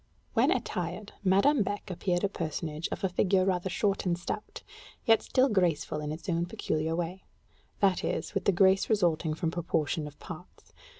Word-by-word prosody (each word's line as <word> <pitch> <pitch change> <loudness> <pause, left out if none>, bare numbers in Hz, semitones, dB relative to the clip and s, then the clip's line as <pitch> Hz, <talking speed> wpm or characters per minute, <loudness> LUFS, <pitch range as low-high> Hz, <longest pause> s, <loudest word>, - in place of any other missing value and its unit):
When - - +4
attired, 180 +3 -2
Madame 200 +9 +4
Beck 205 -1 -3
appeared 175 0 -1
a - - +4
personage 155 -3 -4
of - - -4
a - - +4
figure 185 +1 +2
rather 185 -1 0
short 200 +1 0
and 175 -3 0
stout, 195 +4 -6 0.4
yet 225 -3 +5
still 260 0 +3
graceful 175 - +1
in 150 0 -3
its 155 +2 -7
own 170 -1 0
peculiar 160 -5 -1
way: 175 +2 -3 0.6
that 190 -3 +3
is, - - -2
with 195 - -1
the - - +5
grace 190 +1 +4
resulting 170 -7 +2
from 160 0 -1
proportion 160 -3 -1
of 145 - -12
parts. - - -11
180 Hz, 175 wpm, -29 LUFS, 165-200 Hz, 0.6 s, yet